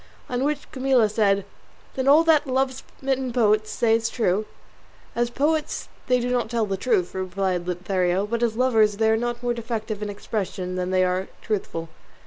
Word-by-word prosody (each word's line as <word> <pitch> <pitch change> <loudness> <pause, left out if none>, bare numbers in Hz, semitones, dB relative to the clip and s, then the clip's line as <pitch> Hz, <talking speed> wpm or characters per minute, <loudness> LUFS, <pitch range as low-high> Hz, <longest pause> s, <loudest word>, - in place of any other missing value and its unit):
On 250 +1 -1
which 295 +1 -2
Camilla 260 -4 +3
said, 200 -2 +1 0.5
"Then 260 0 -2
all 300 +4 +7
that 315 -3 +4
love 260 0 +1 0.3
smitten 265 -1 -1
poets 215 -3 +2
say 225 +1 +2
is 230 0 +1
true?" 215 -3 0 0.7
"As 240 0 +1
poets 300 +5 -1 0.2
they 250 0 +3
do 245 +1 -2
not 245 -3 0
tell 230 -2 0
the 195 -1 -2
truth," 190 -3 0
replied 185 -1 -2
Lothario; 180 +1 0
"but 230 +2 -2
as 230 -2 +1
lovers 225 -4 +3
they 220 0 +3
are - - +4
not 240 +1 -3
more 240 0 +1
defective 225 -2 -4
in 210 - -3
expression 195 -3 -4
than 180 0 -2
they 185 0 +3
are 185 +1 0 0.2
truthful." 185 -6 -3
220 Hz, 180 wpm, -24 LUFS, 195-250 Hz, 0.7 s, all